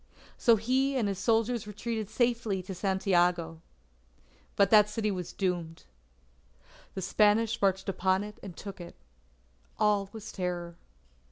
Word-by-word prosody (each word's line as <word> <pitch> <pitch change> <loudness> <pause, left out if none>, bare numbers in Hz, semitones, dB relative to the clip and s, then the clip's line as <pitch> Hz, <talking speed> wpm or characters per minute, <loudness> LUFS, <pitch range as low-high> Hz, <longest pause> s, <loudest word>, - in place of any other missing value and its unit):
So 235 - +4
he 260 +5 +1
and 225 -5 +1
his 195 -2 -3
soldiers 225 +1 +1
retreated 215 +1 -4
in - - -20
safety 230 -5 0
to 190 - -6
Santiago. 175 -4 +1 0.9
But 200 -1 +3
that 210 -1 +7
city 210 0 -1
was 180 -3 -5
doomed. 175 -4 -3 1.1
The 190 - -4
Spanish 215 +4 +2
marched 195 -1 +1
upon 190 0 +1
it 210 0 -9
and 185 -4 -9
took 200 -2 -8
it. 170 - -10 0.8
All 205 -2 +2
was 220 -1 -8
terror. 175 -2 -4
200 Hz, 140 wpm, -29 LUFS, 185-220 Hz, 1.1 s, that